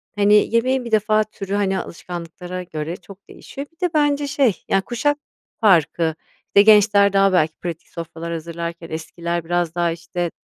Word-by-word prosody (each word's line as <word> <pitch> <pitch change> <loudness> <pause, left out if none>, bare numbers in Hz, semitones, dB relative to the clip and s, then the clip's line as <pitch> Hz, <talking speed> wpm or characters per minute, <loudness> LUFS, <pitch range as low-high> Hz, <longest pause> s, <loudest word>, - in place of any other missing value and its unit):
hani 210 +2 +4
yemeğin 255 +1 +1
bir 235 - -6
defa 215 0 +3
türü 200 -2 -7
hani 195 -2 +1
alışkanlıklara 180 +1 -7
göre 160 0 -5
çok 195 +2 -15
değişiyor. 280 +1 -9
Bir - - -36
de 335 - -14
bence 290 -1 +2
şey, 265 -7 +1
ya, 195 - +3
kuşak 290 +7 -1 0.4
farkı, 165 -4 +3 0.3
işte 200 - +5
gençler 205 -1 +5
daha 195 -1 +4
belki 160 -3 +2
pratik 170 -2 -6
sofralar 165 0 -6
hazırlarken 170 +1 -6
eskiler 170 +1 -4
biraz 175 -1 -1
daha, 175 -1 +1
işte, 170 +1 -4
185 Hz, 160 wpm, -21 LUFS, 170-215 Hz, 0.4 s, işte